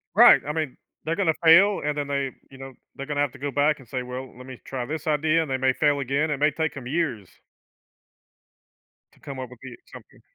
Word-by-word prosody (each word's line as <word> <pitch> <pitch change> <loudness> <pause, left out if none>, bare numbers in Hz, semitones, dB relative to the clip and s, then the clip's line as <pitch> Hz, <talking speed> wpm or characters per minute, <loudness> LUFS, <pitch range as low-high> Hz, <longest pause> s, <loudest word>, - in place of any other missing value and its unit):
Right. - - +8
I 150 - -2
mean, 155 -4 -3 0.3
they're 165 +1 -1
gonna 180 -6 +1
fail, 190 +5 +6
and 150 0 -1
then 145 -1 -2
they, 140 -2 -2 0.2
you 135 - -14
know, 135 0 -9 0.2
they're 140 - -6
gonna 145 0 -2
have 145 -3 0
to 145 - -14
go 145 +2 -3
back 145 +3 +1
and 130 -4 -17
say, 130 +1 -3
"Well, 125 0 -8
let 125 - -12
me 130 -2 -10
try 130 -2 -4
this 155 +5 -6
idea." 155 +2 +2
And 155 - -6
they 130 - +1
may 130 0 +2
fail 145 +1 +1
again. 140 +4 -1
It 145 - -1
may 150 +2 +3
take 160 +1 -3
'em 130 -3 -8
years 135 - -2 1.8
to - - -26
come 140 -2 -8
up 130 -1 -6
with 125 - -14
the 125 -3 -9
something. - - -15
140 Hz, 240 wpm, -24 LUFS, 130-155 Hz, 1.8 s, Right